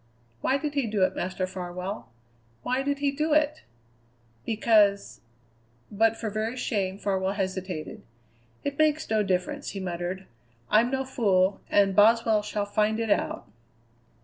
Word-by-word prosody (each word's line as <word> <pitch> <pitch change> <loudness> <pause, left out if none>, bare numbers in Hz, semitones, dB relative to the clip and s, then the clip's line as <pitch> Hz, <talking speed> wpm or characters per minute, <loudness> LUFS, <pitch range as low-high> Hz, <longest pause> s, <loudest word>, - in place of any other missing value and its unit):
"Why 265 - +2
did 295 +1 -3
he 280 -5 0
do 210 -3 +1
it, - - +1
Master 185 +1 -2
Farwell, 180 - -6 0.5
why 255 +1 0
did 285 +1 -1
he 285 0 +1
do 305 +2 0
it?" 300 0 +2 0.9
"Because 210 -3 +2 0.4
" 115 - -36 0.3
But 225 +2 +2
for 220 -2 -4
very 220 +4 -2
shame 195 -6 -1
Farwell 190 -1 -1
hesitated. 185 -4 -4 0.6
"It 285 +1 -4
makes 310 0 +2
no 215 -1 +3
difference," 195 +9 -1
he - - -3
muttered. 180 +1 -4 0.5
"I'm 225 +3 +5
no 265 0 -1
fool 195 -7 +1
and 195 -2 +3
Boswell 220 +1 +5
shall 210 0 -3
find 215 +2 +1
it 225 -2 -1
out." - - 0
210 Hz, 150 wpm, -27 LUFS, 190-250 Hz, 0.9 s, I'm